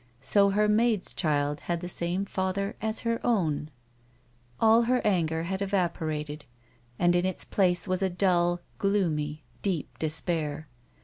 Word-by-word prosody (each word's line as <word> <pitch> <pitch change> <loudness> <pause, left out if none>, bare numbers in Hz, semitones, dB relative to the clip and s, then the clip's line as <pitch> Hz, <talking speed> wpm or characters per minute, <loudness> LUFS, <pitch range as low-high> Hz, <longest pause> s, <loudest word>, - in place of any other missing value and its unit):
So 200 - +3
her 210 +2 +2
maid's 215 -2 +1
child 145 -1 0
had 175 -1 -2
the 180 - -6
same 175 +2 -1
father 190 +1 -2
as 220 +1 -2
her 230 0 -1
own! 160 -10 0 0.9
All 225 +1 +6
her 250 +1 +2
anger 165 -5 +1
had 190 +3 -3
evaporated 160 -6 -2 0.5
and 175 0 +3
in 175 - +2
its 185 0 -1
place 180 -1 +2
was 185 0 -1
a 190 - +2
dull, 175 -1 +1 0.2
gloomy 160 -7 0 0.2
deep 180 -7 -2
despair. 155 -1 -2
180 Hz, 140 wpm, -28 LUFS, 160-200 Hz, 0.9 s, All